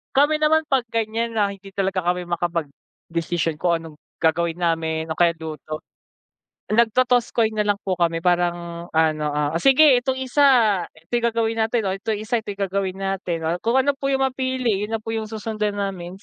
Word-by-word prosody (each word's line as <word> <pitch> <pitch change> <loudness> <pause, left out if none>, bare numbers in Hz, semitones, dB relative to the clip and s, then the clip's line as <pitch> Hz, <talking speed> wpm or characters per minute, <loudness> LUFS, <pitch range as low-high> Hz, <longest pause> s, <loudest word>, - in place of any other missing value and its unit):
Kami 290 +3 +4
naman 315 +1 +4
pag 265 -3 +2
ganyan 230 +1 -1
na 205 -2 +2
hindi 195 0 -12
talaga 190 -2 0
kami 180 +1 0
makapag-desisyon 170 0 -3
kung 175 -1 +2
anong 160 -2 -11 0.2
gagawin 170 +1 +1
namin 160 -1 -1
o 160 - -2
kaya 170 -1 +4
luto. 155 -1 -6 0.9
Nag-totoss 235 +2 +2
coin 220 -2 +1
na 210 - +1
lang 205 -1 0
po 190 - +1
kami 170 -1 +1
parang 175 -1 -1
ano, 155 -1 +1
ah, 150 +1 -1
o - - +1
sige 270 -2 +6
itong 260 0 -1
isa 265 +2 +1 0.6
ito 165 +9 -9
gagawin 230 -1 +1
natin, 225 -1 0 0.2
itong 220 -2 -1
isa 220 +1 -1
ito - - -6
gagawin 195 -1 -2
natin, 195 -3 -2
o - - +1
kung 230 +4 +2
ano 280 +2 +2
po 275 0 -2
yung 270 0 +2
mapili 255 -5 -1
yun 210 - -4
na 225 - -1
po 225 +1 -5
yung 220 -1 -4
susundan 215 -1 -3
namin. 190 -2 -4
200 Hz, 180 wpm, -22 LUFS, 170-230 Hz, 0.9 s, sige